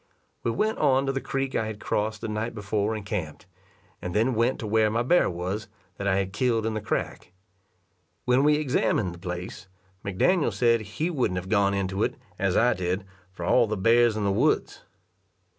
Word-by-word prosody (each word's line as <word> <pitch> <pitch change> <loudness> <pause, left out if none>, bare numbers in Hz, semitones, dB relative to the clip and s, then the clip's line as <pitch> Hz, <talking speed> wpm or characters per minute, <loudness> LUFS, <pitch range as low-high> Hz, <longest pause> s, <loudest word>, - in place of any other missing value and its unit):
We - - -1
went 215 - 0
on 135 -2 +3
to 135 - +1
the 135 0 -3
creek 135 -1 -2
I 110 - 0
had 110 -1 -6
crossed 110 0 -2
the 115 - -3
night 110 +2 -3
before 105 +1 -1
and 105 -2 -6
camped, 80 -6 -4 0.6
and 90 +1 -5
then 115 +5 +2
went 115 +3 +1
to - - -4
where 110 0 +3
my 115 +2 0
bear 175 +8 +3
was, 95 +6 -4 0.3
that 100 - -3
I 95 - +3
had 95 -1 -1
killed 115 -1 +1
in 110 - -1
the 110 - -3
crack. 105 -3 -3 0.9
When 125 +2 +3
we 150 0 +5
examined 125 - 0
the 85 - -12
place, 90 +1 -6 0.4
McDaniel 145 - +1
said 115 -2 +3
he 110 - -3
wouldn't 125 - 0
have 90 +1 -5
gone 100 -2 +3
into 95 0 -2
it, - - 0 0.2
as 95 -2 +1
I 120 +1 +4
did, 95 +1 -2 0.3
for 90 -2 -6
all 120 +5 +4
the 110 0 -2
bears 115 +2 +4
in 105 - -1
the 100 - +2
woods. 95 - +1
110 Hz, 200 wpm, -26 LUFS, 95-120 Hz, 0.9 s, we